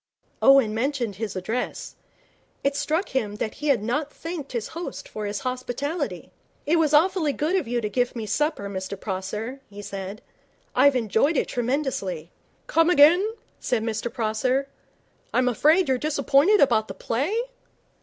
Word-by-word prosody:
Owen 270 -6 +6
mentioned 240 -3 -1
his 215 -2 -4
address. 220 +7 -3 0.7
It 275 0 +1
struck 320 +6 -1
him 220 -6 -1
that 215 +1 -3
he 300 - -5
had 255 -8 +3
not 290 +6 -1
thanked 325 -3 -6
his 235 -3 -3
host 340 +2 -6
for 210 -1 -5
his 205 0 -3
hospitality. 255 +5 -3 0.3
'It 330 +3 +3
was 310 -3 +2
awfully 320 -1 +3
good 310 +7 0
of 375 - 0
you 240 0 -1
to 215 - -1
give 245 +4 0
me 225 -2 -4
supper, 295 -3 -1
Mr 190 0 -5
Prosser,' 210 +7 -4
he 205 0 -9
said. 195 0 -6 0.5
'I've 280 -1 +5
enjoyed 250 - +2
it - - 0
tremendously.' 240 - -2 0.3
'Come 330 +1 +3
again,' 355 +8 +5 0.2
said 230 -3 -1
Mr 225 +1 -2
Prosser. 250 +4 0 0.7
'I'm 255 0 +3
afraid 310 - +4
you're 260 -1 +1
disappointed 300 - +3
about 220 -6 +4
the 195 - -7
play?' 280 - -1
255 Hz, 155 wpm, -25 LUFS, 215-300 Hz, 0.7 s, Owen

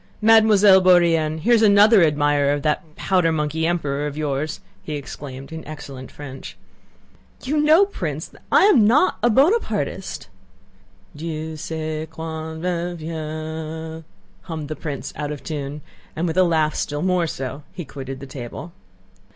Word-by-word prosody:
Mademoiselle 215 -3 +6
Bourienne, 170 -4 +4
here's 235 +2 +4
another 210 0 +6
admirer 145 -2 +2
of 145 -1 -3
that 155 +1 -2
powder 180 -4 +1
monkey 160 +1 -1
emperor 150 -4 -1
of 145 0 -6
yours," 150 0 -2 0.2
he 150 - -5
exclaimed 135 0 -8
in 160 0 -7
excellent 140 -4 -9
French. 135 -2 -9 0.9
"You 295 +4 0
know, 310 +6 +6
Prince, 400 - -5 0.2
I - - +6
am 270 - +6
not 290 +11 +3
a 240 - +4
Bonapartist!" 300 - 0 0.9
"Dieu 160 0 -5
sait 155 0 -4
quand 160 0 -6
reviendra." 160 -2 -4 0.4
hummed 155 - -6
the 155 - -3
prince 145 -4 -6
out 150 0 -4
of 150 - -7
tune 145 -1 -5 0.3
and, 165 - -1
with 165 -2 -2
a 185 - +6
laugh 160 -3 +2
still 145 +2 -3
more 180 -2 +1
so, 135 -1 -5
he 175 - -7
quitted 135 -1 -7
the 140 - -8
table. 135 +5 -8
160 Hz, 145 wpm, -22 LUFS, 150-180 Hz, 0.9 s, Mademoiselle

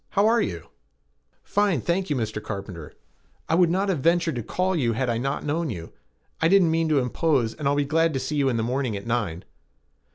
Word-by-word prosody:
How 200 - +5
are 230 +1 +4
you?" 85 -4 -4 0.7
"Fine, 200 - +1
thank 180 - -1
you, 145 - +1
Mr. 110 -3 -3
Carpenter. 95 -7 -7 0.5
I - - 0
would 175 0 +4
not 190 +4 +1
have 180 -6 0
ventured 170 +2 +2
to - - -2
call 185 - -1
you 120 -8 +1
had 120 +2 0
I 115 - -1
not 135 +3 -2
known 155 +2 -1
you. 85 -7 -7 0.5
I 165 - +4
didn't 185 -2 +5
mean 165 0 +1
to 150 - +3
impose 125 -2 +1
and 150 -3 -3
I'll 140 - +2
be 145 0 +1
glad 165 +3 +2
to - - 0
see 150 - -3
you 140 -2 +2
in 120 - 0
the 115 - 0
morning 125 -2 -1
at 100 - -9
nine." 105 -7 -2
140 Hz, 225 wpm, -25 LUFS, 115-170 Hz, 0.7 s, How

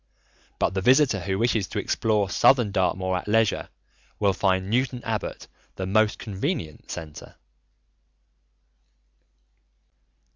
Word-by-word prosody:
But - - 0
the 95 - -1
visitor 130 0 +4
who 95 +1 -2
wishes 110 -3 +1
to - - -7
explore 105 -3 0
Southern 120 +2 +3
Dartmoor 95 -1 0
at 90 - -7
leisure 110 0 +1 0.5
will 100 -2 +2
find 95 -1 0
Newton 125 +2 -1
Abbot 110 -2 -4 0.3
the 95 - -4
most 110 +3 +2
convenient 95 -6 -4
centre. 80 -3 -8
100 Hz, 110 wpm, -25 LUFS, 95-115 Hz, 0.5 s, visitor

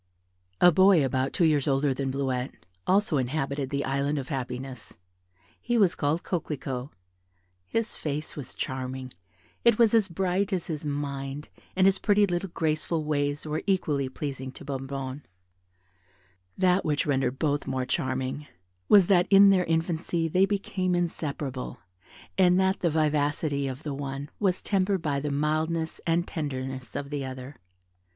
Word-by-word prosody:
A 180 - +7
boy, 185 -3 +5
about 130 +1 0
two 175 - +2
years 150 -3 +2
older 135 0 +2
than 135 +1 -2
Bleuette, 130 -4 -3 0.2
also 195 -4 +3
inhabited 135 +1 -1
the 140 0 -1
Island 140 +2 0
of 135 +1 -4
Happiness; 130 -3 -5 0.6
he 240 0 0
was 195 -6 +4
called 150 +3 0
Coquelicot: 140 -6 -3 0.8
his 225 0 -1
face 150 0 -4
was 140 -5 -8
charming, 130 0 -4 0.5
it 235 -2 +5
was 230 -2 +4
as 220 -4 +4
bright 190 +3 0
as 185 -3 -1
his 155 -2 -4
mind, 140 0 -4 0.3
and 190 0 +4
his 195 0 +4
pretty 205 -1 +4
little 180 0 -2
graceful 160 0 -1
ways 145 -1 -1
were 155 0 -2
equally 150 -8 +1
pleasing 135 -1 -5
to - - -11
Bonnebonne. 135 0 -4 1.4
That 185 0 +3
which 150 -2 0
rendered 135 -3 0
both 145 -1 0
more 130 -1 -1
charming 130 0 -2 0.4
was, 200 -3 +8
that 180 -1 +4
in 200 0 +8
their 185 -2 +3
infancy 165 0 0
they 185 +4 +3
became 190 -2 -1
inseparable, 145 -6 -3 0.6
and 180 0 +5
that 190 0 +2
the 170 - +2
vivacity 150 -2 +1
of 130 +3 -6
the 150 - -3
one 140 +1 -5
was 190 -3 +1
tempered 195 -2 +1
by 140 -2 0
the 145 +1 -3
mildness 155 +3 -1
and 170 +1 +1
tenderness 130 -4 -5
of 140 0 -4
the 145 -2 -2
other. 130 +1 -7
150 Hz, 150 wpm, -27 LUFS, 135-180 Hz, 1.4 s, was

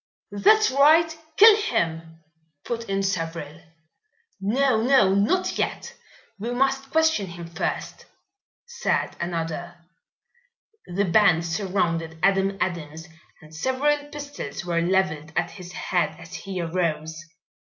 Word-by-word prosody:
"That's 430 - +4
right, 315 +4 +5 0.2
kill 435 +1 +9
him!" 165 - -2 0.4
put 230 -2 -4
in 195 0 0
several. 165 -4 -3 0.8
"No! 225 +4 +1
no! 240 -6 +4
not 210 - +1
yet. - - -3 0.4
We 225 +4 -4
must 270 +1 0
question 320 -11 +2
him 170 -1 -8
first," 165 -1 -4 0.6
said 480 0 -2
another. 170 0 -4 1.1
The 195 +3 0
band 175 -2 +4
surrounded 165 -2 -1
Adam 195 0 +2
Adams 160 -2 -4 0.4
and 155 +1 -16
several 260 - +1
pistols 285 - -7
were 170 -1 0
leveled 170 -4 0
at 175 - 0
his 180 -3 -10
head 180 -1 -1
as 175 - -12
he 185 +2 -6
arose. 165 -2 -2
190 Hz, 115 wpm, -24 LUFS, 165-255 Hz, 1.1 s, kill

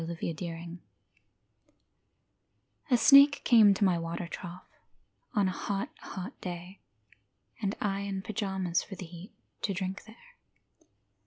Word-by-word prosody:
LAWRENCE 165 0 -4
SNAKE 170 0 -6 2.1
A 250 - +5
snake 280 +3 +7
came 220 -4 +7
to 205 - 0
my 180 -3 +2
water 165 +1 -4
trough 175 +1 -8 0.7
On 205 -2 +3
a - - 0
hot, 195 +2 -3
hot 195 +7 -7
day, 180 +1 -7 0.8
and 200 -1 -1
I 195 -1 -1
in 195 -1 -4
pyjamas 190 -5 -1
for 195 - -9
the 185 - -7
heat, 175 +3 -11 0.3
To 195 - -1
drink 190 +1 -4
there. 235 - -17
190 Hz, 130 wpm, -30 LUFS, 175-205 Hz, 2.1 s, snake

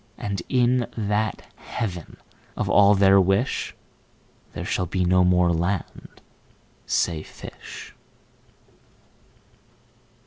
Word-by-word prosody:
33And 100 -3 -3
in 125 -1 +2
that 105 0 -1
Heaven 90 -8 -5 0.4
of - - -1
all 100 0 +6
their 95 0 +6
wish,34There 95 +8 -4
shall 90 - -1
be 90 +1 -1
no 90 +1 +4
more 90 -1 +3
land, 85 +2 -3 0.7
say 80 -3 0
fish. - - -11
95 Hz, 90 wpm, -24 LUFS, 90-105 Hz, 0.7 s, all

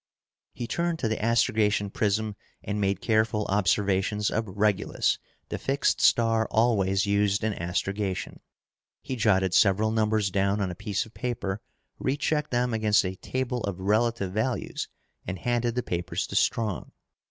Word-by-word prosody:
He 120 - -4
turned 170 +6 -1
to 115 - -1
the 110 -1 -2
astrogation 105 -3 +2
prism 105 +1 0 0.3
and 105 +1 -2
made 100 -1 0
careful 110 -1 +1
observations 100 +1 +1
of 110 0 -1
Regulus, 105 +1 +1 0.3
the - - -3
fixed 140 +1 +1
star 115 -1 +4
always 100 -4 +2
used 100 0 +1
in 110 -1 +1
astrogation. 95 +2 -3 0.6
He 130 - -3
jotted 95 -5 +2
several 105 +2 +4
numbers 110 -2 +1
down 100 +2 +1
on 95 -3 -1
a - - -7
piece 100 +2 -2
of 110 - -17
paper, 110 -5 -3 0.4
rechecked 145 +2 0
them 120 0 0
against 110 -2 +3
a 95 +1 -3
table 130 +2 -2
of 100 -2 -4
relative 105 0 +1
values 115 +4 -2 0.4
and 95 +1 -3
handed 120 +3 0
the 125 - 0
papers 85 0 -2
to - - -7
Strong. 110 -5 0
105 Hz, 150 wpm, -27 LUFS, 100-115 Hz, 0.6 s, star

